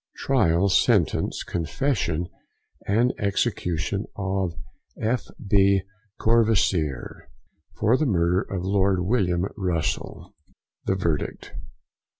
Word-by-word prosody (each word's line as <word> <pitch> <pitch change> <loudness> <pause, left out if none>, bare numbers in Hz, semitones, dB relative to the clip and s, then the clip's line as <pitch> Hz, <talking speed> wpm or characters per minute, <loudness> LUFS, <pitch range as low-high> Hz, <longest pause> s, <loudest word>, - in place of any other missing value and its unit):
TRIAL, 100 -8 +2
SENTENCE, 95 - +2
CONFESSION, 85 - -1 0.3
& - - -20 0.3
EXECUTION 100 -1 -1
OF 95 -3 -2 0.4
F. 120 +3 -1 0.2
B. 100 -1 +4 0.4
COURVOISIER, 105 - +1 0.5
FOR 115 +5 +3
THE 155 - +1
Murder 90 -3 +2
of 90 -2 -5
Lord 95 -1 +2
Wm. 90 -3 +1
Russell. 90 - -3 0.5
THE 95 - +1
VERDICT. 85 -6 -2
95 Hz, 90 wpm, -24 LUFS, 85-100 Hz, 0.5 s, B